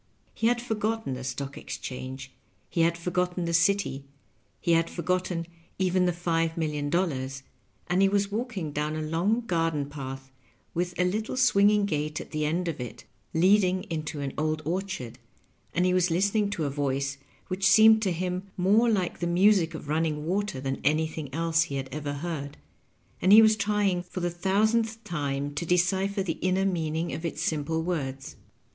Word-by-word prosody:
He 225 - 0
had 240 0 +2
forgotten 220 - -2
the 130 0 -6
Stock 135 +2 -5
Exchange, 130 +1 -7 0.4
he 170 - +1
had 170 +1 +3
forgotten 180 +1 -1
the 170 - -2
city, 165 -5 +2 0.6
he 170 - 0
had 165 0 +3
forgotten 180 0 -1 0.3
even 185 -1 +2
the - - +3
five 165 -1 -1
million 150 -3 -1
dollars, 135 -6 -1 0.4
and 180 +3 +1
he 195 - +5
was 200 0 +1
walking 210 - -3
down 150 +1 -2
a 155 - -3
long 175 +9 +1
garden 165 -8 0
path, 135 -2 -7 0.4
with 175 +1 -2
a 180 - +4
little 215 +7 -2
swinging 210 -4 +4
gate 150 -4 -2
at - - -9
the 155 -1 -1
end 170 +4 0
of 160 -6 -3
it 125 - -7 0.3
leading 185 +1 +4
into 155 -2 -3
an 140 -1 -3
old 155 0 -1
orchard, 165 - -3 0.5
and 180 +1 +1
he 180 - +3
was 180 -1 +3
listening 200 +4 +1
to 175 -6 -2
a - - 0
voice 140 0 -1 0.3
which 185 +1 -4
seemed 220 +1 +7
to 195 -4 +1
him 180 +2 -3
more 210 +6 +4
like 190 -6 0
the 175 - -1
music 175 -1 +3
of 155 - -8
run 155 +2 +1
ning 150 -2 -2
water 195 -3 -1
than 135 0 -3
anything 155 -2 0
else 165 +2 +2
he 140 - -5
had 135 -1 -3
ever 145 -1 -4
heard, 145 -2 -5 0.6
and 185 - +4
he 215 +2 +10
was 220 0 +5
trying 200 -3 +1
for 180 +1 -7
the 175 0 0
thousandth 220 +5 +1
time 145 -6 -3
to 145 - -3
decipher 190 +3 +1
the 165 -4 -3
inner 185 +1 +1
meaning 165 -3 -1
of 160 - -5
its 165 - -3
simple 160 +1 -1
words. 135 -6 -3
170 Hz, 180 wpm, -27 LUFS, 150-195 Hz, 0.6 s, he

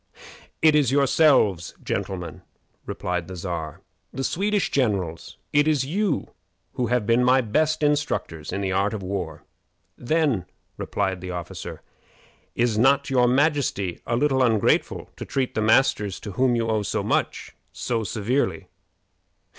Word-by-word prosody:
"It 155 -1 +6
is 145 -5 +3
yourselves, 135 - +3
gentlemen," 90 -5 -4 0.5
replied 90 -2 -3
the 95 - -7
Czar; 85 -4 -5 0.3
"the 135 - -4
Swedish 200 +6 0
generals. 100 -11 -1 0.2
It 145 +1 +4
is 145 -4 +2
you 185 +2 -1 0.4
who 125 -2 -1
have 125 -3 0
been 115 +3 +3
my 130 +1 +4
best 155 +7 0
instructors 145 - -1
in 100 +2 -3
the 95 -1 -1
art 100 +3 +1
of 100 - -6
war." 90 -5 -4 0.5
"Then," 130 - 0 0.3
replied 95 -3 -2
the 90 - -6
officer, 90 -2 -7 0.7
"is 115 -3 +1
not 140 +3 +3
your 125 -2 +4
majesty 130 - +1
a 120 - +1
little 135 0 +2
ungrateful 115 -4 +1
to - - -6
treat 130 -2 -2
the 110 - -1
masters 110 -3 +2
to 105 - -6
whom 125 +4 +2
you 115 -1 0
owe 110 -1 +1
so 100 - -2
much - - -2 0.2
so 115 -2 -2
severely?" 105 -1 -1
120 Hz, 145 wpm, -24 LUFS, 95-140 Hz, 0.7 s, It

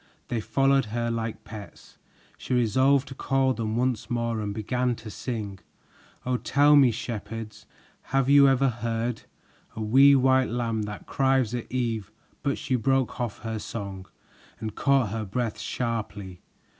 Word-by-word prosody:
They 115 -2 -1
followed 135 +5 +2
her 115 +2 -2
like 115 -1 -4
pets. 105 -3 -11 0.4
She 125 - -3
resolved 130 +4 +3
to - - -7
call 135 0 +1
them 110 -2 -3
once 125 -2 -1
more 115 -2 -1
and 105 -1 -3
began 125 +4 -1
to 110 -1 -9
sing: 105 -5 -5 0.7
"Oh, 125 0 +1
tell 145 +3 +4
me, 135 -3 +7
shepherds, 115 -1 -6 0.4
have 135 -1 +2
you 140 0 +7
ever 135 0 +3
heard, 115 0 -3 0.5
A 110 - -5
wee 135 +6 +6
white 130 0 +3
lamb 115 -1 -1
that 105 - -8
cries 130 -4 +1
at 120 -1 -5
eve 115 -5 -2 0.2
" - - -36
but 140 -1 -1
she 130 - -1
broke 130 +2 0
off 120 -4 -4
her 110 -1 -3
song 100 -3 -6 0.5
and 110 -1 -5
caught 135 -4 +2
her 110 0 -2
breath 110 +2 -3
sharply. 105 -6 -4
120 Hz, 155 wpm, -26 LUFS, 110-130 Hz, 0.7 s, me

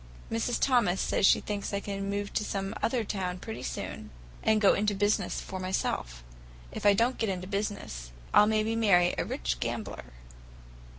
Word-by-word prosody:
Mrs. 230 +1 0
Thomas 235 -9 +3
says 195 - +3
she - - +5
thinks 205 -1 -3
I - - 0
can 200 -1 -4
move 205 0 -3
to - - 0
some 195 0 -3
other 235 0 +1
town 185 -3 -3
pretty 120 -8 -7
soon, - - -5 0.3
and 220 -1 +3
go 200 -2 +6
into 205 0 +1
business 205 +2 +1
for 190 - -6
myself. 60 - -2 0.5
If - - -1
I 200 - +7
don't 235 +5 +1
get 225 - 0
into 185 -1 -3
business, 200 - -4 0.2
I'll 210 - +7
maybe 220 +1 +1
marry 180 -6 +4
a - - +2
rich - - -2
gambler." - - -4
200 Hz, 175 wpm, -29 LUFS, 185-215 Hz, 0.5 s, I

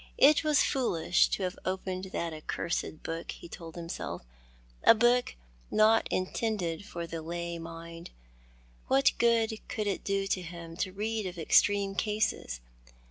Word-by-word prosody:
It 295 +3 +6
was 305 -2 +4
foolish 180 -10 +2
to 195 - -2
have 180 -1 -3
opened 185 0 -3
that 170 -3 -3
accursed 155 0 -3
book, 165 +1 -4
he - - -11
told 165 -1 -9
himself, 170 - -5 0.6
a - - +8
book 240 +2 +3 0.3
not 220 +1 +4
intended 185 -3 -1
for 170 -4 -5
the 165 -1 -5
lay 170 +1 -4
mind. 165 +1 -8 0.8
What 270 +1 +5
good 225 -2 +3
could 215 - -2
it 200 -2 -1
do 195 0 0
him 170 -3 -4
to 185 - -1
read 215 +1 -2
of 180 -1 -7
extreme 200 +4 +3
cases? 210 - -1
185 Hz, 140 wpm, -30 LUFS, 170-220 Hz, 0.8 s, a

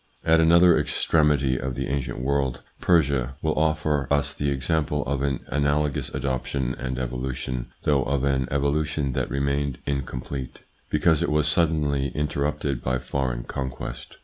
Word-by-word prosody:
At 80 0 +5
another 85 +1 +6
extremity 70 -5 +2
of 65 0 -3
the - - -2
ancient 70 -1 -2
world, 65 -1 0 0.2
Persia 70 -6 +2
will 80 -1 +2
offer 75 -2 +1
us 70 -1 +1
the 70 0 -1
example 75 +1 0
of 70 0 -2
an 70 -2 -1
analogous 75 0 0
adoption 65 -1 -2
and 65 0 -4
evolution, 65 0 -3 0.2
though 70 -2 +3
of 70 +1 0
an 65 -2 +1
evolution 70 0 0
that - - -1
remained 70 -1 -1
incomplete, 65 -1 -4 0.3
because 75 +1 +3
it - - +1
was 75 0 +2
suddenly 75 -3 +2
interrupted 75 -2 -1
by 65 0 +1
foreign 65 -1 -2
conquest. 65 +1 -6
70 Hz, 145 wpm, -25 LUFS, 65-75 Hz, 0.3 s, another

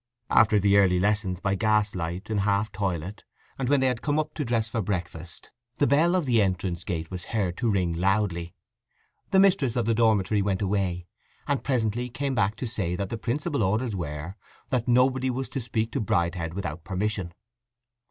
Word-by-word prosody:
After 110 -1 +5
the 100 +1 +4
early 90 -2 +4
lessons 100 -2 0
by 95 -1 0
gas 105 +1 +2
light, 90 +4 -4
in 105 - +1
half 100 +2 +1
toilet, 95 -1 -3 0.4
and 130 -2 -1
when 145 -2 +3
they - - +3
had 125 -3 0
come 145 0 0
up 155 0 -1
to 150 - -3
dress 115 -3 0
for 115 +1 -2
breakfast, 90 -4 -5 0.3
the - - +3
bell 160 +7 +3
of 180 -4 +1
the 120 -4 +3
entrance 90 -3 -1
gate 80 -1 -4
was 90 -1 -6
heard 95 -6 -1
to 120 - 0
ring 90 -5 +1
loudly. 90 -1 0 0.7
The 190 - +4
mistress 180 - +3
of 120 -3 0
the 115 - +2
dormitory 110 -3 +2
went 95 0 0
away, 95 -3 -1 0.4
and 140 -2 0
presently 120 -2 0
came 135 +3 -2
back 105 -3 +1
to 125 - -5
say 95 -7 -2
that 100 +1 -3
the 115 - -3
principal's 140 +2 -1
orders 110 +3 0
were 80 +2 -5 0.3
that 125 -2 0
nobody 130 +1 +3
was 130 +1 -2
to 135 - -3
speak 115 -1 -2
to - - -1
Bridehead 85 -3 -1
without 85 -4 -4
permission. 95 -1 -2
105 Hz, 190 wpm, -26 LUFS, 90-120 Hz, 0.7 s, After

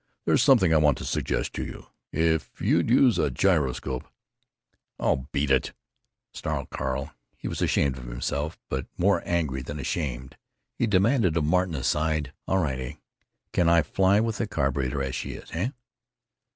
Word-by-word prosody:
There's - - +4
something 120 - +5
I - - +6
want 75 -3 +4
to - - -6
suggest - - -1
to - - -3
you. - - -8 0.3
If 80 0 0
you'd - - +2
use 125 -1 +5
a 75 - +2
gyroscope——" 70 -4 0 0.9
"Oh, 65 +1 0
beat 70 0 0
it!" 65 - +2 0.6
snarled - - -4
Carl. 65 +3 -3 0.3
He - - -6
was - - -4
ashamed 65 -2 +1
of 60 - -9
himself—but 65 +2 -3
more 95 -1 +3
angry 80 -7 0
than 70 +3 -6
ashamed. 65 -4 -3 0.4
He 120 - 0
demanded 100 - +3
of 80 - +2
Martin, 90 +1 +1
aside: 75 +1 0
"All 95 - +2
right, 70 -8 0
heh? 65 -1 -5 0.6
Can 85 -1 +3
I 85 -1 +5
fly 95 +6 +3
with 110 -1 -1
the 115 - 0
carburetor 70 -5 -1
as 65 -1 -3
she 65 - -4
is? - - -11
Heh?" 95 +9 -1
75 Hz, 165 wpm, -26 LUFS, 65-90 Hz, 0.9 s, I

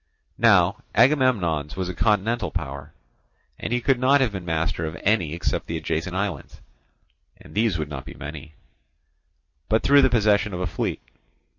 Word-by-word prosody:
Now - - +4 0.2
Agamemnon's 105 - +2
was 95 -1 -3
a 90 - -4
continental 105 +2 +1
power; 70 0 -6 0.7
and - - -5
he 120 - +1
could 130 +1 +2
not 135 +3 +4
have 130 -5 +1
been 95 -3 -6
master 80 0 -1
of 80 -2 -6
any 90 -7 +1
except 85 - -2
the - - -3
adjacent 90 +3 -3
islands 95 -7 -4 0.8
(and - - -15
these 105 -4 +1
would 75 -2 -3
not 70 -4 -7
be - - -10
many), 75 0 -9 1.1
but 110 +1 +2
through 140 0 +6
the 135 - +4
possession 105 -3 +2
of - - -5
a 90 - -1
fleet. 85 - -3
95 Hz, 165 wpm, -24 LUFS, 80-115 Hz, 1.1 s, through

